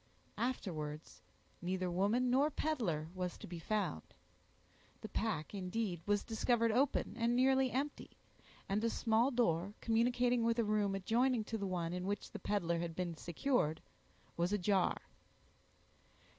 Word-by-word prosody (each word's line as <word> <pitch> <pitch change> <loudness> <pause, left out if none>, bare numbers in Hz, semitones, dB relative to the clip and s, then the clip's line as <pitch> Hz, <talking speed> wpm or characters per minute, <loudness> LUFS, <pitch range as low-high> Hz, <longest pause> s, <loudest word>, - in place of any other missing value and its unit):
Afterwards, 160 -11 -3 0.4
neither 185 0 -1
woman 215 +8 +2
nor 275 +4 +4
peddler 225 - -1
was 180 -1 -3
to - - -9
be 170 -1 -7
found. 190 - -1 1.0
The 215 - -6
pack, 205 -7 -2
indeed, 190 -2 -2
was 205 0 +2
discovered 230 0 +2
open, 250 -3 +1
and 235 +1 +2
nearly 265 +1 +4
empty, 280 +4 -3 0.6
and 205 +3 0
a 230 - +3
small 230 +2 +2
door, 200 -6 +1
communicating 240 +1 +2
with 230 0 +2
a 235 - +3
room 210 -2 +1
adjoining 230 +5 +2
to 225 +1 -3
the 200 - -2
one 175 -2 -2
in 180 +1 -3
which 205 0 -3
the - - -6
peddler 170 -5 0
had 170 -1 -3
been 175 -2 -2
secured, 170 - 0 0.6
was 175 +2 0
ajar. 195 -2 +1
210 Hz, 145 wpm, -36 LUFS, 180-240 Hz, 1.0 s, nor